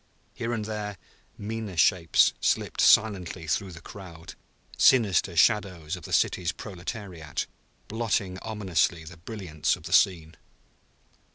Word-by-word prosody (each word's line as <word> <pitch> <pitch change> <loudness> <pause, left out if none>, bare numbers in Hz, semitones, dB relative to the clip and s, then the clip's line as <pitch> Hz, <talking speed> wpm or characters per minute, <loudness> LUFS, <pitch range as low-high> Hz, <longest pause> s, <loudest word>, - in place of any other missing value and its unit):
Here 115 - -4
and 110 -3 -2
there 105 -2 -5 0.4
meaner 105 -3 -5
shapes 85 0 +4
slipped - - 0
silently 95 -6 +3
through 95 +4 -1
the 85 - -11
crowd, 85 -3 -11 0.4
sinister 100 -8 +4
shadows 90 -3 +2
of 90 - -11
the - - -9
city's 85 -2 +1
proletariat, 90 -4 -6 0.4
blotting 100 -4 -1
ominously 95 -7 -1
the 85 +1 -11
brilliance 85 -4 -2
of - - -16
the 85 +1 -5
scene. 85 -5 +2
95 Hz, 120 wpm, -27 LUFS, 85-105 Hz, 0.4 s, shapes